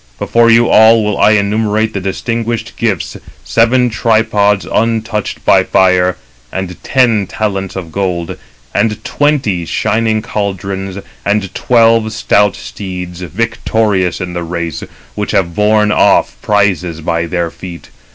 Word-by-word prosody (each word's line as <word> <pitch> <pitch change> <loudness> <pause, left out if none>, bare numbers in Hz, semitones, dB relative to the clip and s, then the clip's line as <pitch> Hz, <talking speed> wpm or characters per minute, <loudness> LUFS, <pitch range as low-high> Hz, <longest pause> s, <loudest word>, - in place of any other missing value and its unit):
Before 115 - +2
you 115 +1 +5
all 110 0 +5
will 105 -1 0
I 105 - +5
enumerate 110 +1 0
the 100 - -2
distinguished 115 +4 -3
gifts: - - -2 0.3
seven 115 - +2
tripods 110 -3 +1
untouched 110 -2 -2
by - - +5
fire, 90 -1 +3 0.4
295 - - -33 0.2
and 90 - -13
ten 115 -7 +2
talents 95 -3 -3
of 90 -4 -6
gold, 90 -3 -2 0.4
and 105 -2 0
twenty 135 - 0
shining 110 +5 0
caldrons, 95 -1 -4 0.3
and 100 -2 -1
twelve 115 -2 +3
stout 105 -3 +2
steeds, 90 -3 -7
victorious 105 -1 -1
in 90 -1 -5
the 85 - -3
race, 85 0 -4 0.3
which - - -3
have 85 -3 +1
borne 105 +2 +2
off - - +3
prizes 90 -5 0
by 85 +1 -1
their 85 -1 -2
feet. 90 -2 -10
105 Hz, 130 wpm, -13 LUFS, 90-110 Hz, 0.4 s, you